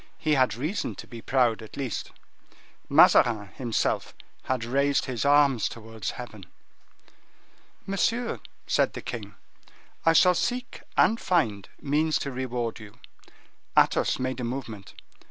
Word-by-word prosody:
He 155 - 0
had 130 -5 +3
reason 155 - -3
to - - -9
be 115 -1 -10
proud, 120 -3 +1
at 110 - -11
least. 130 -7 -4 0.8
Mazarin, 105 -5 +5
himself, 120 +2 -2 0.3
had 130 -3 -1
raised 140 +3 +1
his 130 -1 -3
arms 140 -5 +4
towards 115 -3 -6
heaven. 110 -6 -9 1.4
"Monsieur," 230 +5 0 0.3
said - - +1
the - - -7
king, - - -6 0.7
"I 165 - +5
shall 180 +2 +6
seek 245 +7 -3 0.2
and 230 - +4
find 115 - 0
means 155 +2 +1
to 140 - -4
reward 125 -3 -3
you." 105 -1 -13 0.8
Athos - - +3
made 130 0 -3
a - - -3
movement. 115 -5 -6
130 Hz, 130 wpm, -26 LUFS, 115-145 Hz, 1.4 s, shall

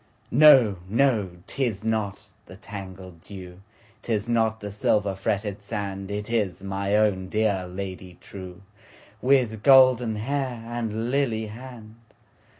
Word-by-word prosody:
No! 130 -8 +7
no! 115 -4 +2 0.2
'tis 110 -4 -2
not 110 -3 -2 0.2
the - - -11
tangled 95 -4 -10
dew,'Tis 105 +4 -7
not 110 -2 +1
the 105 -1 -6
silver 105 0 +1
fretted 100 +1 -2
sand, 100 -1 -5
It 105 +2 -4
is 100 -5 -1
my 100 +1 -1
own 100 -3 +1
dear 100 -4 0
Lady 95 -1 -7
trueWith 105 +5 -3
golden 130 -3 +6
hair 125 +1 -3
and 115 0 -3
lily 120 -6 0
hand! 115 0 -11
105 Hz, 115 wpm, -25 LUFS, 100-115 Hz, 0.2 s, No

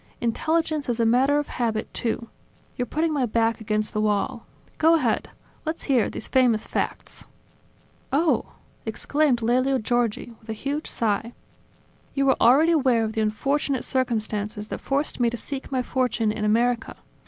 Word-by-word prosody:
Intelligence 310 +4 0
is 240 -1 -1
a 230 - +3
matter 260 +5 +4
of 295 - -1
habit, 225 -3 -2
too. 230 0 -2 0.5
You're 245 - -2
putting 315 +5 0
my 270 -4 +1
back 230 +1 +1
against 215 -1 -1
the 215 - 0
wall. 215 +3 -1 0.3
Go 325 +1 +6
ahead. 325 - 0 0.3
Let's 315 +1 -4
hear 260 -6 +2
these - - -6
famous 245 -5 +3
facts." - - -4 0.9
"Oh!.. 310 +5 +1
." - - -34
exclaimed 285 -5 +1
Lelio 255 +3 +2
Giorgi 240 0 -1
with 220 - -20
a - - -1
huge 280 +7 -3
sigh. 225 +1 -1 0.8
"You 275 -1 +2
are - - +1
already 280 +8 +6
aware 260 -8 +3
of 220 0 -2
the 220 - 0
unfortunate 270 +5 0
circumstances 215 -4 -1
that - - -5
forced 280 +1 -1
me 240 -1 +3
to 240 - -5
seek 275 +3 -6
my 255 -2 0
fortune 240 -4 0
in 210 0 -3
America. 235 +2 +1
245 Hz, 165 wpm, -24 LUFS, 225-275 Hz, 0.9 s, Go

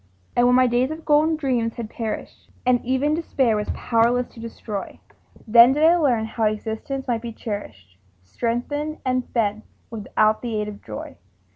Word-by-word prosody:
But 240 0 +4
when 250 - +5
my 255 0 +5
days 245 +2 +2
of 315 +1 -7
golden 305 +2 +4
dreams 250 -6 -1
had 235 -2 -5
perished, 225 0 -6 0.2
And 250 -1 +3
even 265 +4 +1
Despair 270 -8 +1
was 210 0 -2
powerless 240 +2 +2
to - - -15
destroy, 225 -3 -6 0.5
Then 235 +3 +8
did 300 +2 0
I 330 +2 +7
learn 255 -10 +2
how 220 0 -2
existence 220 +5 -3
might 235 -2 0
be 235 0 -5
cherished, 110 - -7 0.2
Strengthened 245 - -3
and 255 -1 0
fed 215 -2 0 0.3
without 215 0 +1
the 230 -3 -2
aid 210 - -2
of 205 -1 -8
joy. 105 -1 -8
235 Hz, 170 wpm, -23 LUFS, 220-260 Hz, 0.5 s, Then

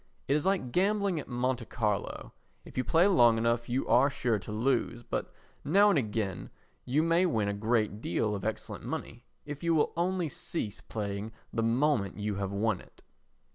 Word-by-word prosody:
It 140 - +2
is 150 +4 +1
like 185 -11 0
gambling 195 - +1
at - - -7
Monte 125 -1 -1
Carlo; 105 -4 -2 0.3
if - - -13
you 130 - +1
play 165 +8 +4
long 120 - +5
enough 115 +1 0
you 125 +3 -1
are 135 +3 +5
sure 120 -5 0
to 105 - -8
lose, 120 +1 0
but - - -3 0.3
now 200 +8 +5
and 165 - +3
again 105 -5 -3 0.4
you 140 +5 +2
may 165 +2 +3
win 110 -10 0
a 100 - 0
great 110 0 0
deal 105 +3 0
of 100 - -4
excellent 110 0 -4
money - - -6 0.2
if 145 -1 -6
you 170 -1 +2
will 150 - +2
only 175 0 0
cease 115 -6 -4
playing 105 0 -4 0.2
the 115 - 0
moment 115 -3 +1
you 105 -1 -2
have 100 -1 -2
won 105 -1 0
it. - - -20
120 Hz, 185 wpm, -30 LUFS, 105-155 Hz, 0.4 s, long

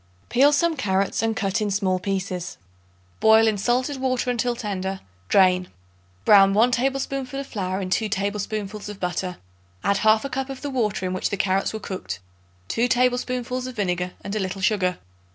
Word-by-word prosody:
Peel 275 +4 +5
some 330 +3 +2
carrots 195 -6 0
and 225 0 0
cut 200 0 -1
in 210 - 0
small 190 -2 +1
pieces. 190 -1 -3 0.6
Boil 220 0 +6
in 215 - +2
salted 250 +7 0
water 255 -1 0
until 245 0 0
tender; 195 -4 -3 0.3
drain. 185 -2 +4 0.6
Brown 195 -1 +7
1 235 +4 +4
tablespoonful 270 +1 -1
of 275 - -4
flour 190 -5 -3
in 185 -2 -4
2 220 +2 +1
tablespoonfuls 205 +1 -3
of 205 -1 -8
butter; 180 0 -2 0.5
add 200 - +2
1/2 220 +6 +3
cup 270 +1 -2
of 270 -1 -7
the 285 - -3
water 215 -7 -1
in 185 - -2
which 185 - -1
the 200 - -2
carrots 190 0 +1
were 220 - -5
cooked, 90 - -5 0.5
2 235 +2 +1
tablespoonfuls 250 0 0
of 255 - -7
vinegar 180 -3 -1
and 200 - -5
a - - 0
little 190 0 -3
sugar. 185 -3 +1
210 Hz, 175 wpm, -24 LUFS, 190-250 Hz, 0.6 s, Brown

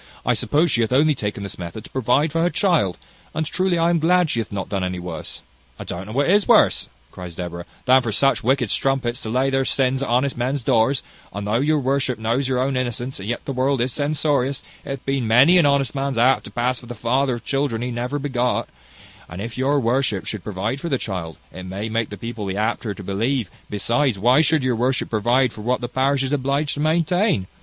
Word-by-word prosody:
I - - +3
suppose 155 +2 +2
she 120 - +2
hath 115 - 0
only 150 +4 +4
taken 105 -5 -4
this 100 - -6
method 90 +4 -7
to - - -12
provide 130 +4 +1
for 165 +2 0
her 175 - +3
child; 170 - +1 0.4
and 160 - 0
truly 185 +2 0
I 165 +1 +3
am 170 - +2
glad 175 0 +3
she 115 - 0
hath 115 - -4
not 100 -2 -4
done 90 -2 -3
worse." 90 -2 -6 0.3
"I - - -7
don't 95 +3 -6
know - - -7
what 140 +3 +1
is 200 +3 +3
worse," - - +4 0.2
cries 90 -2 -9
Deborah, 85 0 -6 0.2
"than 130 +1 +6
for 115 - -3
such 135 +6 +2
wicked 125 -2 +1
strumpets 135 -2 0
to 110 - -5
lay 130 +4 +1
their 135 0 +2
sins 130 0 +1
at 140 - -2
honest 130 +3 +1
men's 125 +2 -2
doors; 115 +5 +2 0.3
and 100 +1 -5
though 105 +3 +1
your 150 +3 +2
worship 135 -2 0
knows 115 +5 0
your 130 -1 0
own 130 +1 0
innocence, 125 0 -3
yet 110 +5 -4
the 135 - -3
world 130 +1 +1
is 125 +1 0
censorious; 145 -2 0 0.2
and 135 - -4
it - - -1
hath - - -34
been 135 -4 -1
many 130 +11 +6
an 155 - +4
honest 140 -2 +1
man's 135 -2 -2
hap 125 +3 +4
to - - -8
pass 120 +1 -1
for 120 - -14
the 120 - -7
father 125 +4 +1
of 120 - -10
children 135 -5 -1
he 125 - -3
never 125 +4 -2
begot; 125 -4 -1 0.6
and 90 - -8
if 115 +3 -5
your 140 +3 +1
worship 120 -4 0
should 105 -4 -5
provide 105 +6 -3
for 170 - -3
the 135 - +1
child, 90 -8 -5 0.2
it 95 - -8
may 100 +4 -4
make 115 0 -1
the 105 - -7
people 115 0 -5
the 95 +1 -3
apter 110 -1 -1
to 100 - -9
believe; 110 +3 -1 0.2
besides, 115 +4 +1
why 125 +8 +4
should 160 -2 +2
your 130 -2 +1
worship 125 +2 0
provide 120 +3 +2
for 105 - -9
what 125 +4 0
the 120 - -4
parish 135 +2 +1
is 135 - -2
obliged 140 +2 0
to - - -6
maintain? 165 - +1
125 Hz, 235 wpm, -22 LUFS, 110-140 Hz, 0.6 s, than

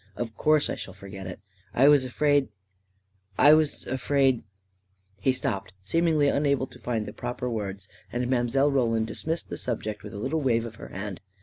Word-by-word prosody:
" - - -32
Of 115 -2 -4
course 155 -1 +3
I - - -2
shall 95 - -7
forget 95 -1 -8
it. 90 - -7 0.4
I 135 +3 +6
was 145 -3 +6
afraid 145 +1 +2 0.5
— 95 0 -38
I 150 - +10
was 155 -1 +2
afraid.. 130 0 +2 0.4
." 95 0 -39
He 130 - +3
stopped, 100 -6 -3
seemingly 160 - +2
unable 140 -2 +2
to - - -16
find 115 -3 -2
the - - -7
proper 125 +1 -4
words, 100 -4 -4 0.2
and 120 +1 -1
Mile. 130 +3 +2
Roland 115 -5 +2
dismissed 160 +9 -3
the - - -5
subject 110 -4 -3
with 105 +1 -9
a - - -5
little 145 +8 -1
wave 115 -4 +2
of 110 -2 -8
her - - -9
hand. 95 0 -6
120 Hz, 195 wpm, -27 LUFS, 100-140 Hz, 0.5 s, I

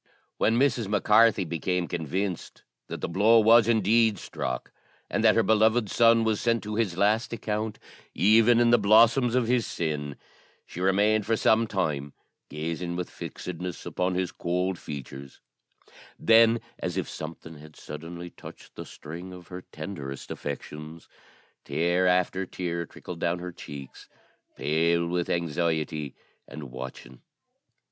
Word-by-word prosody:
When 115 +1 +2
Mrs. 125 -5 +2
Mac 105 0 0
Carthy 105 -2 +5
became 85 +2 -2
convinced 90 +3 -4 0.2
that - - -7
the - - -2
blow 105 +6 +4
was 115 +1 +6
indeed 110 -1 +3
struck, 65 -7 -5 0.4
and - - 0
that 110 -1 +5
her 115 - +4
beloved 110 0 +3
son 115 -1 +5
was 110 -2 0
sent 115 -1 +1
to 105 0 -5
his 105 -6 -1
last 105 +4 +2
account, 110 -1 -3 0.4
even 115 +4 +5
in 120 0 +4
the 120 - +5
blossoms 115 +4 +5
of 125 -2 +2
his 120 -1 +1
sin, 75 -4 -3 0.5
she 90 - -8
remained 105 +3 +2
for 115 0 +2
some 110 +1 +3
time 75 -9 -2 0.4
gazing 85 +3 -4
with 90 0 -4
fixedness 90 0 -7
upon 90 0 -1
his 90 -1 -1
cold 90 +1 -2
features; 70 -1 -9 0.8
then, 115 +1 +5 0.2
as - - -3
if - - -2
something 80 0 -8
had 75 0 -14
suddenly 85 +3 -8
touched - - -13
the - - -8
string 85 +5 -9
of 90 -2 -12
her 90 0 -7
tenderest 70 -8 -7
affections, 75 +3 -7 0.6
tear 85 +2 +1
after 90 +1 +1
tear 85 -2 -4
trickled 85 -2 -9
down 85 +1 0
her 90 +1 -6
cheeks, 70 -5 -10 0.5
pale 85 +2 +1
with 85 0 -2
anxiety 80 -3 -1 0.3
and 70 -3 -9
watching. 65 -1 -9
90 Hz, 145 wpm, -27 LUFS, 80-110 Hz, 0.8 s, was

